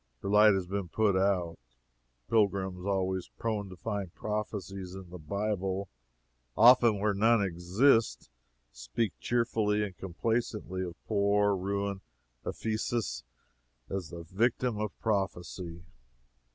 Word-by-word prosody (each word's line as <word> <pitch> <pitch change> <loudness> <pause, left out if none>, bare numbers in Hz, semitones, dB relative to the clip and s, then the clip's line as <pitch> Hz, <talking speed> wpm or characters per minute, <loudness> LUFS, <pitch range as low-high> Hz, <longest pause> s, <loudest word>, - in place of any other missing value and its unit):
Her - - -2
light 105 0 +6
has 95 -2 -1
been 95 -1 -3
put 105 +1 +2
out. 95 -3 +1 0.7
Pilgrims, 95 -3 +1
always 95 -2 -1
prone 105 -3 -2
to 90 - -9
find 100 -2 -4
prophecies 100 -3 -4
in 95 -2 -10
the 90 - -8
Bible, 95 +2 -2 0.7
and 115 - +6
often 120 -4 +7
where 105 +1 +2
none 110 +2 +4
exist, 95 - +2 0.4
speak - - -2
cheerfully 110 -3 +1
and 100 -3 -5
complacently 100 0 -2
of 85 -2 -6
poor, 100 -1 +2
ruined 100 +1 -2 0.4
Ephesus 110 0 -2 0.7
as 95 -4 -3
the 85 -1 -8
victim 115 +5 0
of 105 -2 -4
prophecy. 90 -4 -2
100 Hz, 120 wpm, -30 LUFS, 95-105 Hz, 0.7 s, often